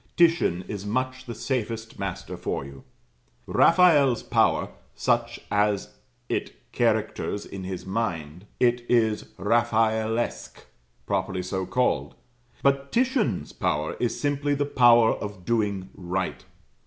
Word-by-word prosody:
Titian 165 - +3
is 100 -2 -5
much 130 +4 -2
the 120 - -5
safest 115 -4 -3
master 100 -1 -4
for - - -3
you. 70 0 -11 0.6
Raphael's 155 -8 +5
power, - - +2 0.3
such - - 0
as 105 -1 +1 0.4
it - - -3 0.2
characters 100 - 0
in 95 -1 -7
his 95 -1 -5
mind; 90 -4 -3
it 120 -1 +2
is 110 -3 +2
"Raphaelesque," 115 0 0 0.4
properly 95 -1 -1
so 95 0 -3
called; 125 0 0 0.5
but 140 0 +2
Titian's 250 - 0
power 75 +1 -1
is 120 -2 -1
simply 145 0 0
the 145 0 0
power 120 -4 +5
of 100 -3 -7
doing 100 -4 -1
right. 95 +1 -3
110 Hz, 115 wpm, -26 LUFS, 95-130 Hz, 0.6 s, Raphael's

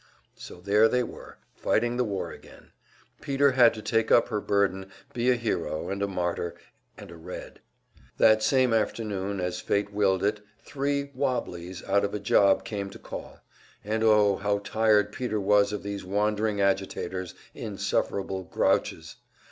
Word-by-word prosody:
So - - -11
there 105 +4 +4
they 125 +2 +1
were, - - -10 0.2
fighting 120 +2 0
the 125 - +1
war 100 -5 -3
again; - - -15 0.5
Peter 140 0 +2
had 125 -3 +6
to 110 - -8
take 115 0 +1
up 115 - +5
her 105 -1 -2
burden, 95 -2 0 0.2
be 120 +1 +1
a 125 - +5
hero, 85 -10 -2
and 100 0 -3
a 100 - +1
martyr, 90 -2 -2 0.4
and - - -11
a - - -10
"Red." 80 - -9 0.6
That 110 0 +5
same 130 0 +3
afternoon, 100 -3 -1
as 90 0 -2
fate 100 0 -1
willed 95 -2 +2
it, 105 +1 0 0.2
three 140 +3 -3
"wobblies" 90 -9 -3
out 100 +1 +2
of 100 +1 -2
a - - -2
job 100 -1 +3
came 100 -2 -4
to - - -11
call; - - -9 0.4
and 110 +2 -1
oh, 105 -3 +4
how 100 +1 0
tired 105 -1 +2
Peter 110 -2 -2
was 100 0 +3
of 105 -2 -4
these 100 -1 -5
wandering 105 +2 0
agitators 95 -2 -1 0.2
insufferable 95 -2 -2
"grouches!" - - 0
105 Hz, 160 wpm, -27 LUFS, 95-110 Hz, 0.6 s, had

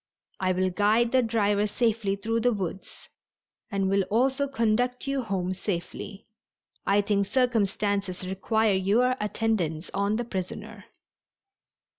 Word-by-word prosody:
I 185 -1 +1
will 185 0 +1
guide 215 +5 +3
the 260 - +4
driver 210 -3 +1
safely 220 -2 0
through 225 +3 -1
the 245 +2 +3
woods 190 -3 -5 0.6
and 200 -3 0
will 195 +1 +3
also 265 +6 +2
conduct 245 -1 0
you 275 -1 0
home 190 -5 -2
safely. 190 +1 -5 0.6
I 200 +1 +4
think 200 -1 0
circumstances 200 -6 0
require 215 +3 +1
your 215 +7 +2
attendance 205 -7 -1
on 200 +2 +1
the 240 +2 -2
prisoner." 185 -5 -6
205 Hz, 125 wpm, -27 LUFS, 195-230 Hz, 0.6 s, the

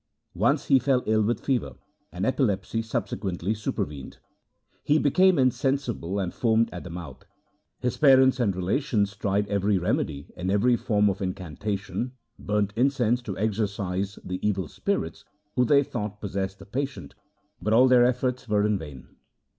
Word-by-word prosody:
Once - - +1
he 135 - +5
fell 130 -2 +1
ill 110 0 +2
with 115 +3 -1
fever, 130 -3 -1 0.4
and 90 +3 -3
epilepsy 115 -5 0
subsequently 100 -4 -2
supervened. 75 -9 -4 0.7
He 150 - +3
became 180 +5 +4
insensible 130 -7 0
and 95 -3 -2
foamed 115 -1 +2
at 90 - -7
the 90 - -8
mouth. 85 -5 -8 0.5
His 125 - -2
parents 130 -2 +5
and 105 -6 +1
relations 100 +1 0
tried 100 0 0
every 100 0 +1
remedy 75 -5 -2
and 90 +1 -3
every 115 +5 +3
form 105 -3 +1
of 100 0 -1
incantation, 100 - -4 0.3
burnt 105 -1 -1
in 130 +4 +4
cense 125 -3 0
to 105 -6 -6
exorcise 100 -2 -2
the 90 0 -4
evil 95 -5 0
spirits - - -3 0.3
who 125 - +3
they 140 +3 +5
thought 105 -5 -5
possessed 95 -1 -3
the 100 - -13
patient, 125 - -4 0.5
but 105 +4 -1
all 125 +4 +6
their 125 -1 +6
efforts 125 0 0
were 105 0 +2
in 105 -2 +1
vain. 75 -5 -10
105 Hz, 155 wpm, -26 LUFS, 95-125 Hz, 0.7 s, all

